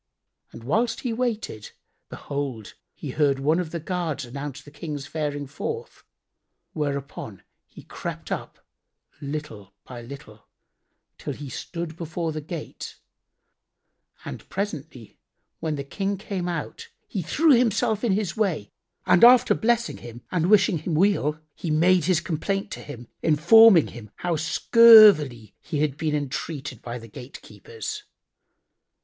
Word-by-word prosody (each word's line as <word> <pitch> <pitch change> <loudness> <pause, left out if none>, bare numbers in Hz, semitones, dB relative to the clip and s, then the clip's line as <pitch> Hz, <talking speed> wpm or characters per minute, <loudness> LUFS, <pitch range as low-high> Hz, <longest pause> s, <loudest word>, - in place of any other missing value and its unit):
And 115 - -11
whilst 225 - 0
he 245 -3 -2
waited, 225 - -3 0.4
behold, 135 -7 -5 0.2
he - - -6
heard 145 -3 +2
one 150 +5 +1
of 175 -3 -3
the 170 - -4
guards 160 -4 -3
announce 140 +3 -7
the 145 - -14
King's 150 -2 -6
faring 145 -2 -3
forth; 455 - -6 0.7
whereupon 140 - -4 0.2
he - - -14
crept - - -7
up, - - -6 0.6
little 140 -10 -7
by 120 -2 -9
little, 115 -4 -12 0.7
till - - -4
he 145 -1 -8
stood 170 +3 -6
before 165 0 -4
the 155 0 -5
gate; 160 +1 -7 1.3
and - - -8
presently 155 - -6 0.4
when 155 -2 -2
the 140 - -4
King 195 +8 -3
came 185 -2 -4
out, 170 -3 -5 0.2
he 195 - -3
threw 305 - +3
himself 230 -3 +2
in 225 -5 +2
his 195 -4 -1
way 180 - -1 0.3
and 175 - +4
after 250 +1 +8
blessing 235 0 0
him 120 0 -11
and 180 -1 +1
wishing 200 -5 +4
him 160 +1 -3
weal, 160 -4 +2
he 165 - -6
made 170 +2 +3
his 180 -2 +2
complaint 195 +4 -2
to - - -6
him 120 -5 -10
informing 170 +4 +6
him 115 -3 -11
how 175 -1 -2
scurvily 165 - +6
he 150 - -4
had 150 -3 0
been 150 0 -1
entreated 145 0 -4
by 120 -1 -6
the 115 -1 -11
gatekeepers. 425 - -8
160 Hz, 140 wpm, -24 LUFS, 140-195 Hz, 1.3 s, after